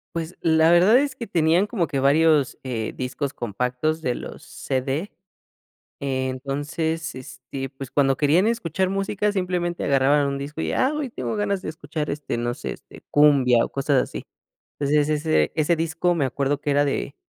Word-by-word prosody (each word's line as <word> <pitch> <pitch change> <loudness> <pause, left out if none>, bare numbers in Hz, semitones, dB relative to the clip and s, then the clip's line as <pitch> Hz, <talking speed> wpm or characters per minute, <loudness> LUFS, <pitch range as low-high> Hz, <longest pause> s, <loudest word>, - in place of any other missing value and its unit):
Pues, 165 +1 -4
la 160 0 +4
verdad 175 +6 +6
es 280 -2 -1
que 240 - -6
tenían 170 -1 +2
como 200 -6 -1
que 140 - -2
varios, 150 0 +3
eh, 115 -4 -4
discos 135 +2 -3
compactos 125 +8 -2
de 125 - +1
los - - -8
CD. 135 +8 -3 0.9
Eh, 130 -1 -2
entonces, 145 +4 -3
este, 130 +1 -7
pues 135 -1 -9
cuando 135 -2 +2
querían 155 +8 +3
escuchar 190 -5 0
música, 195 +2 -1
simplemente 180 -3 -2
agarraban 140 +1 +3
un 140 - -2
disco 145 +3 -6
y, - - -1
ah, 265 +3 +1
hoy 295 -4 -3
tengo - - -4
ganas 205 -2 -1
de - - -5
escuchar 155 -1 -5
este, 145 -4 -3
no 120 +1 -2
sé, - - -6
este - - -16
cumbia 135 -5 +5
o - - -5
cosas 140 -1 +1
así. - - -5 0.6
Entonces 145 +1 +2
ese 150 - +1
ese 160 +2 +2
disco, 165 +2 0
me 150 - +1
acuerdo 140 +2 -1
que 145 - -2
era 145 +1 +3
de 140 0 -2
150 Hz, 175 wpm, -23 LUFS, 135-170 Hz, 0.9 s, verdad